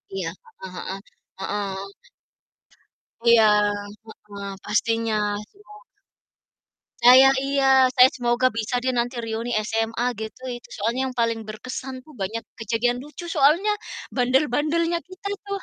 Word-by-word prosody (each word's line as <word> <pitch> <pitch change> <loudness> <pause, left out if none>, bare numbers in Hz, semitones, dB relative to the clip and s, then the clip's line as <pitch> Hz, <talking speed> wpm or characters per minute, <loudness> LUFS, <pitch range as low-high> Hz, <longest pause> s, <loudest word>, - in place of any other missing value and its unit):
Iya, 185 -4 -2 0.3
heeh 185 -1 -7
heeh. 190 +1 -4 0.4
Heeh. 195 0 -4 1.4
Iya, 235 -1 +7 0.8
heeh, 200 -1 -7
pastinya, 225 +1 0 0.3
sih - - -29
ya. 420 - -16 1.3
Saya 260 +2 +8
iya, 270 -1 +4
saya 255 +1 +8
semoga 245 -1 +1
bisa 225 +2 -3
deh 260 - +1
nanti 245 0 -1
reuni 230 +2 -3
SMA 225 +1 -1 0.2
gitu. 220 +3 -7
Itu 240 - -12
soalnya 230 +5 -1
yang 255 - -7
paling 230 -1 0
berkesan 255 +4 -6
tuh 310 - -16
banyak 225 +4 -3 0.2
kejadian 235 +3 0
lucu, 300 +4 -10
soalnya 315 +9 +4 0.4
bandel-bandelnya 300 +6 +1
kita 370 +2 -8 0.2
tuh. 400 0 -3
240 Hz, 125 wpm, -23 LUFS, 220-270 Hz, 1.4 s, Saya